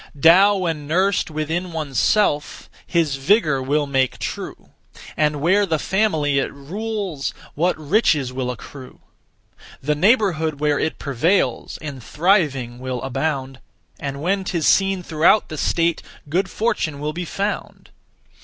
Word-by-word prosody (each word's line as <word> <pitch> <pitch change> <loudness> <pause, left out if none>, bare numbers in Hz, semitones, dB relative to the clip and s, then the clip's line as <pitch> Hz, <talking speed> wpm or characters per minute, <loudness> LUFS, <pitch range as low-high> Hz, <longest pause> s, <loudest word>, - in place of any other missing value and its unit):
Tao 190 +7 +6
when 165 -6 -3
nursed 185 +5 +1
within 160 +4 -3
one's 150 -6 -2
self, 175 -9 +1 0.2
His 160 -6 +1
vigour 150 -2 +2
will 145 +3 0
make 135 -2 0
true; - - -6 0.5
And 150 -2 +1
where 190 +6 +3
the 165 -5 0
family 155 -7 +1
it - - -2
rules 190 +1 -4 0.2
What 175 +4 +1
riches 150 - +1
will 130 -1 -3
accrue! 130 +2 -9 0.8
The 150 +3 0
neighbourhood 165 - +2
where 150 -1 +1
it 160 - -1
prevails 155 +8 0
In 145 -3 -6
thriving 140 - 0
will 130 -1 -4
abound; 135 0 -2 0.4
And 140 0 -5
when 195 +2 0
'tis 170 -4 -2
seen 195 -2 +3
throughout 165 +6 +3
the 155 - -6
state, 170 -1 +1 0.3
Good 185 +6 0
fortune 165 -10 -1
will 150 +1 -3
be 175 +2 -4
found. 200 +4 -4
155 Hz, 135 wpm, -21 LUFS, 140-185 Hz, 0.8 s, Tao